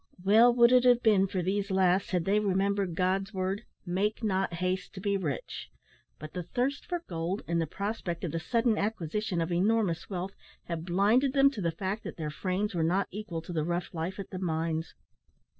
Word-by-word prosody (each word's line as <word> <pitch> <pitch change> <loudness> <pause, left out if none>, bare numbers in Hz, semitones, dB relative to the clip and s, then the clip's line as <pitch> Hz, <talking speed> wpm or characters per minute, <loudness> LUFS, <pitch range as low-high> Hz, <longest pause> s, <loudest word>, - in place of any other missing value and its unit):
Well 220 +5 +6
would 235 0 +6
it 250 -1 +6
have 245 -1 +5
been 200 -3 +4
for 185 -2 -2
these 200 +3 -1
last 190 0 +2
had 180 -3 0
they 205 +2 +3
remembered 195 -2 0
God's 195 +3 0
word, 190 +4 -2 0.2
"Make 200 +6 -1
not 190 -4 0
haste 185 +3 -2
to - - -6
be 200 +1 0
rich;" 155 -10 -4 0.5
but 155 +1 -9
the 180 - -3
thirst 255 +10 -2
for 350 -1 -3
gold, 170 +3 -3
and 170 0 +1
the 165 - -1
prospect 200 -1 -4
of 170 - -2
the 165 - -2
sudden 230 +4 +1
acquisition 205 -2 -1
of 165 +1 -2
enormous 195 -1 +1
wealth, 190 0 -4 0.3
had 170 -1 -5
blinded 215 +9 +3
them 275 0 +5
to 220 - -6
the 170 - +1
fact 190 +6 -3
that - - -6
their 155 -2 -3
frames 190 +6 -2
were 170 - 0
not 180 +5 +1
equal 190 -5 -5
to 175 - -7
the 155 -2 0
rough 175 +2 -2
life 170 +3 -3
at 200 - -7
the 185 - -5
mines. 165 -2 -2
190 Hz, 205 wpm, -29 LUFS, 170-210 Hz, 0.5 s, Well